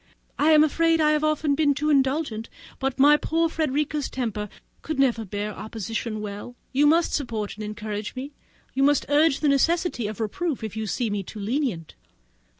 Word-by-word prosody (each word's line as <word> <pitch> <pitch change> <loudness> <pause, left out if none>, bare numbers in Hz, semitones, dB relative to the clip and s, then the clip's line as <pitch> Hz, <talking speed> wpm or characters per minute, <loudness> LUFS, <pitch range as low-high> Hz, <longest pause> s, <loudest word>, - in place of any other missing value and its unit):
I 300 - +4
am 305 0 +7
afraid 330 +2 +2
I 305 -1 +4
have 305 0 +1
often 305 -1 +1
been 285 -1 +2
too 300 +2 0
indulgent, 265 -5 0 0.3
but 270 0 -2
my 290 +2 +6
poor 330 +2 +1
Frederica's 300 -2 -1
temper 215 -5 -3 0.3
could 310 -2 -4
never 245 -5 +2
bear 205 +2 -4
opposition 220 +1 -4
well: 205 +4 -7 0.2
you 290 +3 +4
must 330 +3 +3
support 225 -7 -2
and 215 - -8
encourage 210 0 -5
me; 270 +3 -6 0.4
you 270 - -1
must 285 0 +3
urge 290 0 +3
the 305 - +2
necessity 285 - +1
of 215 0 -6
reproof 255 - -2
if 220 -1 -5
you 220 -1 -3
see 230 +1 -1
me 205 -1 -1
too 200 +3 -9
lenient." 215 - -2
270 Hz, 180 wpm, -25 LUFS, 215-300 Hz, 0.4 s, am